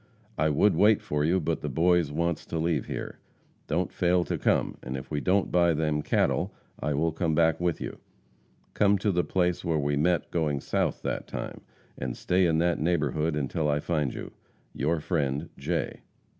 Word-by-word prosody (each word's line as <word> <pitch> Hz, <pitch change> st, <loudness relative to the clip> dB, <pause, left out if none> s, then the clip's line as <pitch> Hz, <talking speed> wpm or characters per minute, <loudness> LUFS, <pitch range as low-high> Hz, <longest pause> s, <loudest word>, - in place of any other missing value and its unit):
I 80 Hz, +1 st, +2 dB
would 100 Hz, +8 st, +3 dB
wait 105 Hz, 0 st, +5 dB
for 75 Hz, 0 st, -2 dB
you, 85 Hz, +5 st, +3 dB
but 80 Hz, -1 st, -1 dB
the 75 Hz, -, -3 dB
boys 85 Hz, +2 st, +2 dB
wants 85 Hz, +1 st, -1 dB
to 85 Hz, -, -3 dB
leave 80 Hz, +1 st, 0 dB
here. -, -, -5 dB, 0.5 s
Don't 85 Hz, +3 st, -1 dB
fail 90 Hz, 0 st, +2 dB
to -, -, -2 dB
come, -, -, +1 dB
and 65 Hz, +2 st, -4 dB
if 65 Hz, -, -9 dB
we 75 Hz, -1 st, -1 dB
don't 95 Hz, +3 st, +1 dB
buy 85 Hz, -2 st, +4 dB
them 75 Hz, -1 st, 0 dB
cattle, -, -, +1 dB, 0.3 s
I 75 Hz, 0 st, -1 dB
will 80 Hz, +3 st, +1 dB
come 80 Hz, -1 st, 0 dB
back 80 Hz, 0 st, +3 dB
with 90 Hz, -2 st, 0 dB
you. -, -, -6 dB, 0.7 s
Come 100 Hz, -1 st, +4 dB
to 100 Hz, +2 st, 0 dB
the 90 Hz, -1 st, +1 dB
place 90 Hz, -2 st, 0 dB
where 85 Hz, -3 st, 0 dB
we 70 Hz, 0 st, 0 dB
met 85 Hz, +4 st, +1 dB
going 75 Hz, -4 st, 0 dB
south -, -, -1 dB
that -, -, -3 dB
time, -, -, -6 dB, 0.4 s
and 65 Hz, -1 st, -4 dB
stay 90 Hz, 0 st, +2 dB
in 80 Hz, -1 st, +2 dB
that 85 Hz, +1 st, +1 dB
neighborhood 80 Hz, -1 st, 0 dB
until 75 Hz, +2 st, -1 dB
I 75 Hz, 0 st, +2 dB
find 75 Hz, -4 st, -1 dB
you. -, -, -7 dB, 0.4 s
Your 80 Hz, +2 st, 0 dB
friend, 75 Hz, -2 st, -1 dB
J. 80 Hz, +5 st, -3 dB
80 Hz, 190 wpm, -27 LUFS, 75-90 Hz, 0.7 s, wait